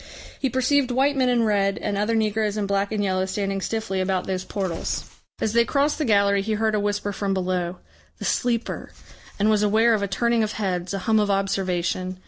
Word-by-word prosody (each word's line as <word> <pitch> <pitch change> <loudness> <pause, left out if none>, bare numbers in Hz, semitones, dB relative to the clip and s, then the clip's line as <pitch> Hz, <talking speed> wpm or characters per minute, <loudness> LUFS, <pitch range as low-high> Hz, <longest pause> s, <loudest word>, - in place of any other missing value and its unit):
He 270 - 0
perceived 260 +1 +2
white 270 +3 +2
men 260 -2 +2
in 240 -2 +3
red 200 -2 +1
and 205 - -2
other 210 +3 0
negroes 215 -1 0
in 210 - 0
black 200 +1 0
and 210 -1 0
yellow 190 -1 0
standing 195 0 -2
stiffly 220 -3 -2
about 185 -1 0
those 185 -1 -2
portals. 185 -4 -3 0.3
As 220 - -1
they 235 0 +5
crossed 285 +6 +1
the 305 - 0
gallery 200 -3 +3
he 215 +2 -2
heard 220 +1 +1
a 210 - +2
whisper 205 0 -1
from 195 -1 -1
below, 180 -1 -1 0.4
"The - - -6
Sleeper," 240 -2 -1 0.4
and 205 - +2
was 210 -1 +3
aware 220 +3 +4
of 215 - +1
a 200 - 0
turning 235 +4 +1
of 215 -1 -1
heads, 185 -2 -2
a - - -2
hum 220 -1 +3
of 210 -1 +1
observation. 185 -2 -1
205 Hz, 210 wpm, -24 LUFS, 195-225 Hz, 0.4 s, they